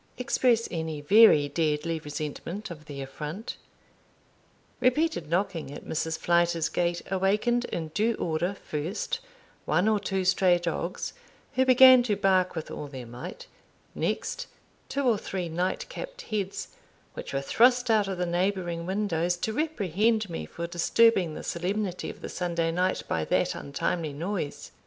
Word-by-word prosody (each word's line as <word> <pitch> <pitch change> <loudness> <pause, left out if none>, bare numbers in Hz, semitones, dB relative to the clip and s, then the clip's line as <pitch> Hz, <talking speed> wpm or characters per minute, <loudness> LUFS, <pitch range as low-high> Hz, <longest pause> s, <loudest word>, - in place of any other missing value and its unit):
express 245 -2 +2
any 160 -3 -3
very 150 -2 +6
deadly 155 +2 0
resentment 155 +7 -5
of 155 -2 -10
the 140 -2 -6
affront. 150 - -6 1.2
Repeated 255 - +1
knocking 170 -4 -1
at 145 - -9
Mrs. 160 0 -2
Flyter's 170 -1 +2
gate 175 -1 -1
awakened 210 +6 +2
in 160 -2 -4
due 220 +7 +1
order, 175 +4 -1
first, 180 - -3 0.5
one 180 +4 +2
or 215 -1 +3
two 190 -1 -2
stray 185 -1 +4
dogs, 175 +1 -3 0.4
who 260 0 +2
began 255 0 +9
to 230 -4 0
bark 190 -2 +2
with 160 - -5
all 150 - -5
their 130 -3 -8
might; 125 - -8 0.5
next - - -2 0.4
two 280 - -1
or 235 -5 +3
three 185 -2 -4
night 175 +3 -1
capped - - -7
heads, 200 - -3 0.4
which - - -7
were 135 - 0
thrust 245 - +3
out 210 -3 +3
of 190 -2 -3
the 180 - 0
neighbouring 175 -1 -1
windows 180 -3 0
to 220 +5 -2
reprehend 220 - +1
me 165 - -5
for 170 - -5
disturbing 175 0 +3
the - - -7
solemnity 185 +1 -2
of - - -10
the - - -3
Sunday 170 -2 -1
night 180 +2 0
by 80 - 0
that - - +1
untimely 150 +2 -2
noise. 150 -3 -4
180 Hz, 150 wpm, -27 LUFS, 160-215 Hz, 1.2 s, began